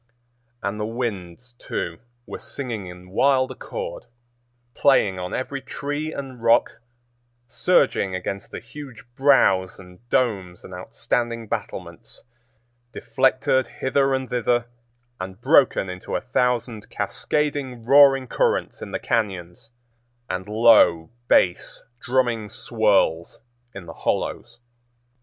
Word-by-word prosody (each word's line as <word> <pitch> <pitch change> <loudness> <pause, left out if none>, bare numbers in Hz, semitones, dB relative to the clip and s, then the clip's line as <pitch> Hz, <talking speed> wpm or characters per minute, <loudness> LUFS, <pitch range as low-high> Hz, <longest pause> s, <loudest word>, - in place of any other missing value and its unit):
And 100 +1 -2
the - - -1
winds, 115 -1 -5
too, 85 -1 -4 0.3
were - - -7
singing 120 -8 -5
in 90 +1 -12
wild 130 +4 +3
accord, - - -7 0.7
playing 105 -10 +3
on 90 0 -5
every 135 +2 -4
tree 145 +3 -4
and 130 -5 -7
rock, 115 0 +3 0.7
surging 100 - +2
against 100 +2 -5
the - - -7
huge 140 -6 -11
brows 100 -10 +3
and 90 -1 -14
domes 100 -10 0
and 95 - -11
outstanding 115 +4 -2
battlements, - - -6 0.7
deflected 130 +2 +1
hither 135 0 +1
and 130 0 -3
thither 120 -1 +1 0.5
and 95 0 -7
broken - - +4
into 90 0 -5
a - - -1
thousand 115 - -1
cascading, 140 -5 -2
roaring 135 0 +6
currents - - 0
in - - -6
the - - -3
cañons, 95 -3 -2 0.6
and 95 +2 -4
low 110 -7 +5 0.2
bass, 90 -1 +2 0.2
drumming 120 -4 0
swirls 100 -9 +1 0.4
in 100 -3 -8
the 85 - -9
hollows. 120 +1 -3
115 Hz, 115 wpm, -23 LUFS, 95-130 Hz, 0.7 s, roaring